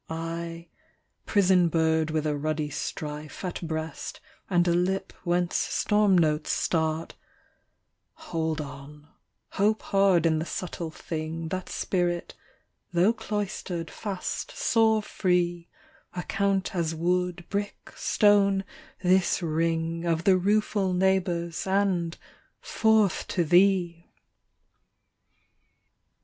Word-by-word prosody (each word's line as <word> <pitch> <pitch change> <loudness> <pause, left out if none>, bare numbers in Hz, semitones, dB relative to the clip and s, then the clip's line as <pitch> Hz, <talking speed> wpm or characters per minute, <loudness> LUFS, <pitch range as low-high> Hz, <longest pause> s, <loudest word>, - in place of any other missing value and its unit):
I 165 +1 -5 0.6
prison 185 -3 +4
bird, 160 -1 +2
with 155 0 -1
a 150 -1 0
ruddy 150 0 -2
strife 150 +4 -5
At 180 - -4
breast, 160 -1 -5 0.3
and 175 -2 +3
a 170 - +3
lip 185 +2 0
whence 175 0 0
storm 210 -2 +2
notes 155 -2 +1
start 160 -1 0 1.1
20 - - -14
Hold 160 -2 -1
on, 145 +1 -10 0.4
hope 215 +2 +1
hard 195 -4 +3
in 160 -1 +3
the 160 - -3
subtle 175 -2 -4
thing 160 0 -5
That's 185 +1 -4
spirit: 175 -2 -1 0.6
tho' 180 +6 +3
cloistered 205 -6 -4
fast, 195 -4 -4
soar 220 -2 +3
free; 175 -4 0 0.5
Account 195 +2 -1
as 165 -2 -1
wood, 180 +1 -1
brick, 205 0 -4
stone, 200 -2 +3 0.4
this 185 0 +3
ring 165 +1 -1
Of 165 -1 0
the 190 0 +5
rueful 200 0 +1
neighbours, 180 -2 0
and 190 -4 +1 0.4
forth 220 -3 +2
to 175 - 0
thee! 175 0 +3
175 Hz, 110 wpm, -27 LUFS, 165-195 Hz, 1.1 s, the